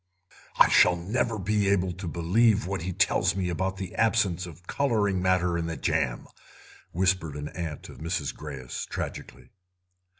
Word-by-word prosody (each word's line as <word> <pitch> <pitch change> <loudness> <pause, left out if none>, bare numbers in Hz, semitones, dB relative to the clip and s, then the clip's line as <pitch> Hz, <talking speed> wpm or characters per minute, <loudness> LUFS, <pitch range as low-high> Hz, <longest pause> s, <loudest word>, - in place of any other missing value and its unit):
"I - - +8
shall 90 - +5
never 110 +7 -1
again 100 - -6
be 105 -1 +2
able 95 -2 +2
to 90 +1 -7
believe 100 +6 +2
what 95 -1 -3
he 90 +2 -3
tells 90 - +2
me 95 -2 -1
about 95 +2 -2
the 95 -2 -6
absence 105 -6 +1
of 85 +1 -13
colouring 105 -7 +1
matter 90 -2 +2
in 85 - -2
the 80 - -4
jam," - - -1 0.7
whispered 90 -4 0
an 75 0 -5
aunt 80 -4 -6
of - - -12
Mrs. 80 -2 -2
Greyes 70 -5 -7
tragically. - - -7
90 Hz, 165 wpm, -27 LUFS, 85-100 Hz, 0.7 s, I